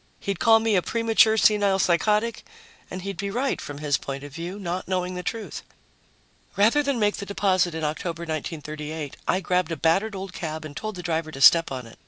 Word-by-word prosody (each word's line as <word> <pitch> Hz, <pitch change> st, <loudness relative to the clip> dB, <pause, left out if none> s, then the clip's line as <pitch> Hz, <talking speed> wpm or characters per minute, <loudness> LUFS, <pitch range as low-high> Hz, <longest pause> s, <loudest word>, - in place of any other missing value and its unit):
He'd 200 Hz, -3 st, -3 dB
call 225 Hz, -1 st, +6 dB
me 225 Hz, -1 st, +1 dB
a 185 Hz, -, +4 dB
premature 225 Hz, +1 st, +3 dB
senile 205 Hz, -3 st, +4 dB
psychotic 210 Hz, +5 st, +1 dB, 0.5 s
and 185 Hz, -, -6 dB
he'd 195 Hz, -2 st, -5 dB
be 200 Hz, +1 st, -3 dB
right, 255 Hz, +6 st, -1 dB
from 145 Hz, -, -7 dB
his 145 Hz, -1 st, 0 dB
point 140 Hz, 0 st, -6 dB
of 145 Hz, -1 st, -10 dB
view, 170 Hz, +5 st, -6 dB
not 180 Hz, -2 st, -4 dB
knowing 185 Hz, -1 st, -1 dB
the 180 Hz, -, -4 dB
truth. 220 Hz, +4 st, -5 dB, 0.9 s
Rather 220 Hz, +9 st, +4 dB
than 280 Hz, -3 st, -1 dB
make 210 Hz, -2 st, +1 dB
the -, -, -5 dB
deposit 185 Hz, -4 st, +1 dB
in 160 Hz, -, -4 dB
October, 165 Hz, +3 st, -3 dB
1938, 155 Hz, -1 st, -5 dB
I 185 Hz, -, +2 dB
grabbed 180 Hz, -3 st, 0 dB
a 165 Hz, -, -2 dB
battered 195 Hz, +8 st, +1 dB
old 190 Hz, -1 st, -6 dB
cab 155 Hz, -2 st, -5 dB
and 145 Hz, -2 st, -9 dB
told 215 Hz, -1 st, -5 dB
the 180 Hz, -, -7 dB
driver 165 Hz, -1 st, -1 dB
to 135 Hz, -, -9 dB
step 165 Hz, +4 st, +6 dB
on 130 Hz, -2 st, -5 dB
it. 115 Hz, -, -15 dB
180 Hz, 210 wpm, -25 LUFS, 160-205 Hz, 0.9 s, call